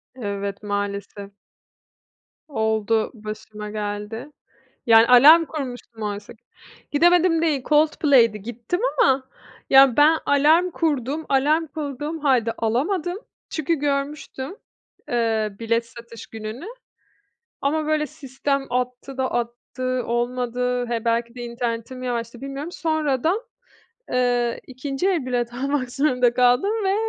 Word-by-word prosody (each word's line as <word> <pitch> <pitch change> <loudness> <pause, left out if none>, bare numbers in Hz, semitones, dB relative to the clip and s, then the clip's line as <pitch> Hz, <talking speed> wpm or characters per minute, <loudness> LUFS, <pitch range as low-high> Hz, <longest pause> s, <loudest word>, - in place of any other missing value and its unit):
Evet 200 -3 -4
maalesef. 200 0 -4 1.2
Oldu, 220 -4 0
başıma 215 -1 -8
geldi. 210 +5 -5 0.5
Yani, 225 0 +7
alarm 300 +7 +8
kurmuştum 245 -7 -7
oysa 205 +1 -5
ki 220 - -28 0.5
Gidemedim 340 +2 +4
değil. 295 -6 +1
Coldplay'di, 285 -8 +3
gittim 240 - -4 0.2
ama, 265 0 +3 0.4
ya 270 -2 +7
ben 310 +2 +6
alarm 315 +6 +4
kurdum, 300 -1 -1
alarm 300 +4 +2
kurduğum 295 +2 -5
halde 255 -6 +2
alamadım. 320 - -1 0.3
Çünkü, 315 +1 -1
görmüştüm, 280 +2 -3 0.5
eee, 220 -3 0
bilet 230 0 0
satış 230 -1 -12
gününü. 220 - -7 1.0
Ama, 305 +2 0
böyle, 305 -1 0
sistem 275 -2 -3
attı 250 +2 -3
da 260 -1 -1
attı, 245 +1 -3
olmadı, 245 +1 -1
he, 235 -1 -3
belki 235 +1 0
de, 245 - -7
internetim 235 +1 -4
yavaştı, 240 -1 -4
bilmiyorum, 275 +4 -6
sonradan, 315 - 0 0.7
eee, 245 -1 +1
ikinci 270 +7 -3
el 330 -9 0
bilet 240 -1 -2
almak 270 -1 -1
zorunda 250 -4 +2
kaldım 250 +10 +3
ve 385 +1 +2
250 Hz, 115 wpm, -23 LUFS, 230-295 Hz, 1.2 s, alarm